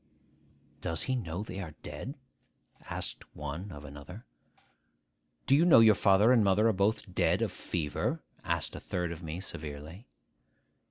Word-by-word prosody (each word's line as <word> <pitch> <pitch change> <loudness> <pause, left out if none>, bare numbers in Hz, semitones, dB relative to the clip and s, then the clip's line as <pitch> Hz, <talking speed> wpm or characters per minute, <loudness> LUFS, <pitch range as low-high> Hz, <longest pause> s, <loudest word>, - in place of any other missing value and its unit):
'Does 80 -1 -2
he 130 - 0
know 95 -5 -3
they 95 -2 -7
are 80 -6 -6
dead?' 135 - -6 0.7
asked - - -3
one 75 +7 -5
of 75 -2 -9
another. 75 +10 -10 1.2
'Do 135 - +5
you 155 - +5
know 175 -8 +8
your 110 -1 +8
father 100 +3 +5
and 120 -4 +5
mother 100 +3 +4
are 110 - +3
both 100 0 0
dead - - +2
of - - -1
fever?' 75 -4 -2 0.2
asked - - -1
a - - -5
third 90 -2 -2
of 85 0 -7
me 80 +1 -5
severely. 80 - -7
95 Hz, 155 wpm, -31 LUFS, 80-110 Hz, 1.2 s, know